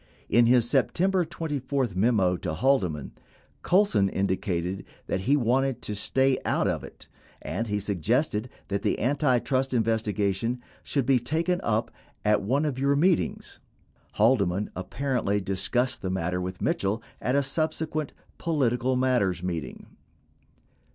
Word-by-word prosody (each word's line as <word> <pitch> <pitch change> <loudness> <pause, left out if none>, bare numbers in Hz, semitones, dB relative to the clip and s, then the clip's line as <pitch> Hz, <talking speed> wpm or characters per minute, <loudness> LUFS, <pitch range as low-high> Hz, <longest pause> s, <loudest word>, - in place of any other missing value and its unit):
In 120 +1 +5
his 120 -1 +4
September 175 - +2
24 145 -6 -2
memo 95 -3 +3
to 80 - -4
Haldeman, 90 - +1 0.5
Colson 180 - +3
indicated 95 -1 -1 0.2
that - - -1
he 140 +9 +3
wanted 130 +1 +1
to 105 - -2
"stay 130 +6 +1
out - - +1
of - - -1
it," - - -11 0.4
19 - - -4
and 115 - -1
he 105 -1 -1
suggested 105 - 0 0.2
that 100 0 -1
the - - 0
antitrust 130 0 +1
in 115 - +3
vestigation 110 +1 0 0.2
"should 140 -4 -1
be 130 -1 +4
taken 165 +8 0
up 110 - 0 0.3
at 105 -1 +3
one 135 +9 +1
of 135 -4 -2
your 140 +1 +2
meetings." 170 +3 0 0.6
20 - - -16
Haldeman 105 -4 +2
apparently 105 +1 -1
discussed 120 +7 -1
the 95 - -3
matter 90 -1 -1
with 90 +1 -5
Mitchell 105 +4 0 0.2
at 125 - 0
a 140 - +3
sub 155 +4 0
sequent 155 -2 -3 0.3
"political 130 -6 +1
matters" 120 -9 +1
meeting. 85 -7 -4
120 Hz, 145 wpm, -27 LUFS, 100-135 Hz, 0.6 s, In